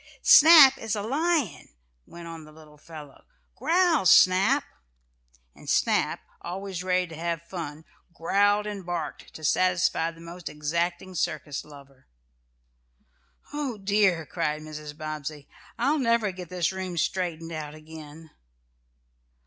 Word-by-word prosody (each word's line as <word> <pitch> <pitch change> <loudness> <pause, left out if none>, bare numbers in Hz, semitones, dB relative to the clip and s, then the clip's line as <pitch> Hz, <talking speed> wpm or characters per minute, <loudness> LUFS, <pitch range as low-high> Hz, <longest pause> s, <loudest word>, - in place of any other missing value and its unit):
"Snap 300 -4 +8
is 225 -1 -3
a 205 - -4
lion," 285 - -1 0.4
went 170 0 -11
on 165 -1 -9
the 155 - -15
little 155 -1 -17
fellow. 150 -3 -12 0.3
"Growl, 335 - +2
Snap!" 195 +13 +5 0.9
And - - -12
Snap, - - +1 0.2
always 185 0 -6
ready 185 0 +1
to 165 -2 -11
have 170 0 -3
fun, 160 -3 -7 0.3
growled 205 +5 +1
and 205 -2 -6
barked 170 -4 -5
to 155 - -10
satisfy 180 0 +1
the 165 0 -13
most 170 +1 -9
exacting 170 +5 -3
circus 155 -4 -3
lover. 140 -3 -16 1.5
"Oh 285 -6 -3
dear!" 195 -4 +1
cried 155 -1 -3
Mrs. 150 -1 -9
Bobbsey. 155 -2 -6 0.3
"I'll 285 +5 +1
never 230 -5 +1
get 180 -2 -10
this 180 -2 -1
room 185 -2 -5
straightened 165 0 -2
out 155 -2 -6
again." 155 0 -12
170 Hz, 125 wpm, -26 LUFS, 155-200 Hz, 1.5 s, Snap